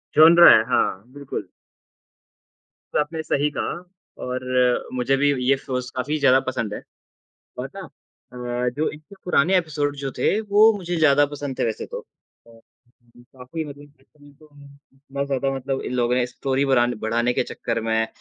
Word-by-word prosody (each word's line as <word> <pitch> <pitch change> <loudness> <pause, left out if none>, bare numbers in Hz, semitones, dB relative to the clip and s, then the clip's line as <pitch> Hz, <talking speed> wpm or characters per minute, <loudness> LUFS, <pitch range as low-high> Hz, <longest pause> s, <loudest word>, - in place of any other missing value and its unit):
Genre 170 +2 +9
है, 110 - +6
हाँ, 95 -5 +1
बिल्कुल। 140 -1 -6 1.4
तो - - +2
आपने 160 +2 -2
सही 145 0 0
कहा - - -2 0.5
और 125 0 -4 0.5
मुझे 130 +2 +1
भी 145 +1 +3 0.2
ये 135 0 +4
शोज़ 125 -2 -5
काफ़ी 145 +4 -1
ज़्यादा 135 -2 +5
पसंद 110 -5 -2
है - - -6 0.8
और - - -5
ना - - -7 0.5
अ, 125 0 -2
जो 155 - 0
इनके 155 +6 -14
पुराने 180 +2 +3
एपिसोड 145 -4 -2
जो 135 -1 -4
थे 205 +11 +2
वो 215 +1 +5
मुझे 175 -2 -4
ज़्यादा 145 -2 +4
पसंद 145 -2 -6
थे - - +1
वैसे 110 - -4
तो - - -6 0.5
अ, - - -18 0.7
काफ़ी 130 +5 -8
मतलब 145 -1 -10
जैसे 135 - -28
हम 145 - -18
इनको 150 +2 -19 0.5
इतना 140 0 -5
ज़्यादा 135 -1 -1
मतलब 135 0 -3
इन - - -4
लोगों 120 0 +1
ने 125 -1 +1
स्टोरी 135 +2 -1
बरान 125 -3 +2
बढ़ाने 120 +2 0
के - - +1
चक्कर 115 -1 -3
में 110 0 +1
135 Hz, 170 wpm, -22 LUFS, 125-150 Hz, 1.4 s, Genre